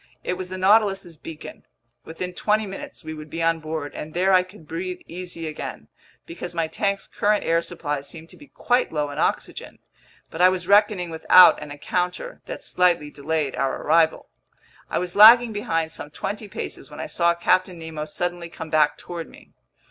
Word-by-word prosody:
It - - -1
was 180 0 -6
the 185 - -5
Nautilus's 195 -3 +2
beacon. 160 +1 -10 0.4
Within 180 +3 -6
twenty 215 +3 +1
minutes 195 -2 -8
we 155 0 -6
would 155 0 -10
be 165 +1 -3
on 165 0 +2
board, 155 -2 -5
and 155 +1 -8
there 190 +2 +3
I 185 - +6
could 180 -3 -14
breathe 180 +3 -5
easy 175 -1 -7
again—because 170 +2 -9
my 165 -1 +1
tank's 200 +5 -2
current 210 0 0
air 165 0 +2
supply 150 -5 -3
seemed 160 +3 -9
to - - -14
be 295 - -15
quite 245 -2 0
low 150 -2 -2
in 145 - -6
oxygen. - - -2 0.5
But 160 - -4
I 180 - +8
was 180 -1 -3
reckoning 200 -3 +3
without 175 +2 +7
an - - -8
encounter 180 - -3
that - - -7
slightly 175 -5 +1
delayed 150 -1 -2
our 135 -1 -1
arrival. 160 +1 +2 0.6
I - - -1
was 180 0 -3
lagging 225 +2 +8
behind 165 -6 -1
some 145 - -6
twenty 205 +7 -5
paces 195 - -6
when - - -11
I - - -3
saw 170 0 +1
Captain 185 +1 +1
Nemo 160 -2 -6
suddenly 175 +2 -4
come 160 -2 -9
back 155 -2 +3
toward 170 -2 -7
me. - - -18
170 Hz, 185 wpm, -23 LUFS, 160-185 Hz, 0.6 s, I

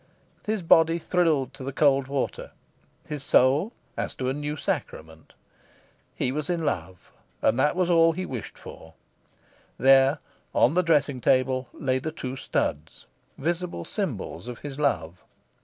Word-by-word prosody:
His 215 -3 -1
body 165 0 +5
thrilled 155 -6 +1
to 135 - -10
the 135 - -4
cold 140 -1 +3
water, 140 -1 -3 0.6
his 150 -2 -5
soul 140 - +3 0.2
as - - -4
to 130 -1 -2
a - - 0
new 150 +1 -4
sacrament. 80 - -5 0.8
He 125 - -1
was 150 +3 -3
in 170 -2 -1
love, 90 - -4 0.3
and 115 +3 +3
that 150 +5 +2
was 180 -1 +1
all 165 -1 +5
he 185 +3 -4
wished 120 - -7
for... - - -12 0.8
There, 135 +2 +5 0.4
on 125 - +4
the 180 - +3
dressing 145 -6 +1
table, 130 0 +2
lay 130 -2 -1
the 155 +4 -4
two 130 -4 -6
studs, 80 - -3 0.3
visible 170 - -3
symbols - - -4
of 125 -1 -6
his 145 -1 -8
love. 90 - -1
140 Hz, 150 wpm, -26 LUFS, 130-165 Hz, 0.8 s, body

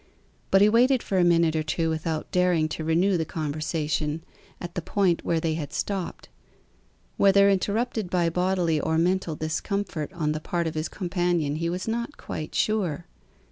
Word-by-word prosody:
But 195 - +5
he 205 - +7
waited 245 +3 +4
for 190 - 0
a - - +5
minute 170 -2 +3
or 155 - +1
two 160 +1 -1
without 160 0 -3
daring 180 -3 +2
to 160 - -4
renew 175 +4 +2
the 165 - 0
conversation 155 0 -2 0.4
at 175 -1 -7
the 175 - -3
point 180 0 +1
where 165 - +1
they 160 0 0
had 155 -3 -4
stopped: 195 -3 -3 0.9
whether 200 0 +5
interrupted 210 +1 -1
by 175 -2 +1
bodily 180 -3 +1
or 160 +2 0
mental 175 -1 +1
discomfort 155 +1 -3
on 155 -4 -1
the 155 - -2
part 170 +1 -2
of 160 - -2
his 155 +1 -3
companion 175 -5 -1
he 170 +1 -1
was 180 +4 -4
not 235 +5 -3
quite 155 - -6
sure. 180 -7 0
170 Hz, 175 wpm, -26 LUFS, 155-190 Hz, 0.9 s, he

